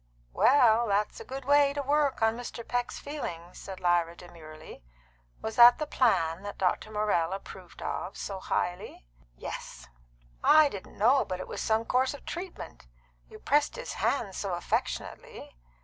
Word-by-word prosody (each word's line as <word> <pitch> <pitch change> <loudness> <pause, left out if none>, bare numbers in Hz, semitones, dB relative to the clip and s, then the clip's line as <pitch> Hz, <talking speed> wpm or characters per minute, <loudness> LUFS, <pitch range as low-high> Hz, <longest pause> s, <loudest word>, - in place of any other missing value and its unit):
"Well, 240 -3 +5
that's 205 0 0
a - - -7
good 265 0 -7
way 285 0 +4
to 285 - -2
work 285 0 +2
upon 225 0 +1
Mr. 235 -1 -7
Peck's 245 0 -2
feelings," 175 - -7
said 190 -1 -8
Lyra 175 -2 +1
demurely. 155 -3 -12 0.6
"Was 220 0 -4
that 240 0 +9
the 305 - -2
plan 185 - +1
that 205 0 -7
Dr. 190 +3 0
Morrell 210 -5 0
approved 190 -2 -9
of 190 - -4
so 195 -2 -5
highly?" 175 - -3 0.3
"Yes." 65 0 -8 0.5
"I 305 -1 +6
didn't 200 -7 -10
know 245 +7 +4
but 185 -1 -5
it - - -6
was - - -5
some 225 +1 +1
course 260 +3 +1
of - - -14
treatment. 350 - -8 0.4
You - - -11
pressed 290 +1 +1
his - - -6
hand 225 -8 0
so 190 -1 -3
affectionately. 175 - -4
215 Hz, 160 wpm, -28 LUFS, 180-270 Hz, 0.6 s, that